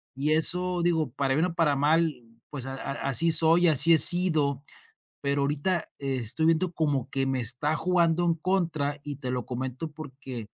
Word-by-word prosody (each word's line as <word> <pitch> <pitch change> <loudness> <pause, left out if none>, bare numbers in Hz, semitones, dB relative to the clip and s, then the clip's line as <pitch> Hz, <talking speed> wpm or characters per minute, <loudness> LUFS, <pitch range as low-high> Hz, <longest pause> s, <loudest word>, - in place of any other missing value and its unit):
Y 140 +3 -1
eso 180 +3 +2
digo 160 -6 0
para 135 0 -1
bien 160 - +1
o 170 - -6
para 160 -4 +1
mal, 155 +2 +1 0.3
pues 140 -4 -7
a 135 0 -6
a 135 - -6 0.2
así 165 +6 +3
soy 165 +2 +4
y - - +6
así 160 +2 +4
he - - +6
sido. 155 -6 +3 0.6
Pero 140 0 0
ahorita 150 +5 -1
estoy 135 +2 -1
viendo 165 +2 +1
como 145 -6 -2
que 135 0 -1
me 135 -1 -1
está 125 +6 -1
jugando 175 0 +1
en 170 -1 +1
contra 165 -5 -2
y 145 -1 -6
te 130 -2 -5
lo 125 -2 -3
comento 130 +4 -5
porque 135 -6 -9
150 Hz, 185 wpm, -26 LUFS, 135-165 Hz, 0.6 s, y